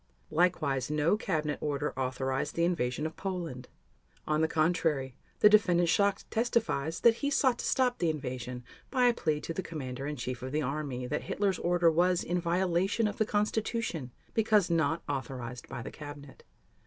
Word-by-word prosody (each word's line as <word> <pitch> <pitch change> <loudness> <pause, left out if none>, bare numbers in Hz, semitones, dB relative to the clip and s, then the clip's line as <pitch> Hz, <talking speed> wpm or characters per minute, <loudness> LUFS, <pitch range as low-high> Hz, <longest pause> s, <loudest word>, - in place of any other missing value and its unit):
Likewise 155 -6 +1
no 150 +5 +2
cabinet 155 -8 -2
order 145 0 -1
authorized 130 0 -2
the 170 - +1
invasion 150 -5 -1
of 160 - -4
Poland. 170 -10 -4 0.6
On 155 0 +1
the 160 - +3
contrary, 155 -5 +1 0.3
the - - +9
Defendant 175 -5 +4
Schacht 200 +2 +2
testifies 220 - 0
that 235 -1 +5
he 285 - -1
sought 260 -3 +2
to - - -3
stop 250 -2 +2
the 170 - +2
invasion 125 -4 -4 0.3
by 255 -2 +2
a 245 - +5
plea 155 -9 0
to 165 - -4
the 190 - -2
Commander 135 -6 -5
in 150 - -3
Chief 125 -1 -4
of 130 +2 -5
the 155 - +1
Army 135 -2 -3
that 125 - -3
Hitler's 195 -3 0
order 175 -1 +3
was 175 +2 +2
in 175 +1 -1
violation 185 +5 +1
of 205 - -5
the 220 - +2
Constitution 210 - -1 0.2
because 210 -5 +3
not 160 0 +1
authorized 125 -3 -5
by 120 - -5
the - - -7
Cabinet. 145 -2 -10
160 Hz, 175 wpm, -30 LUFS, 135-190 Hz, 0.6 s, the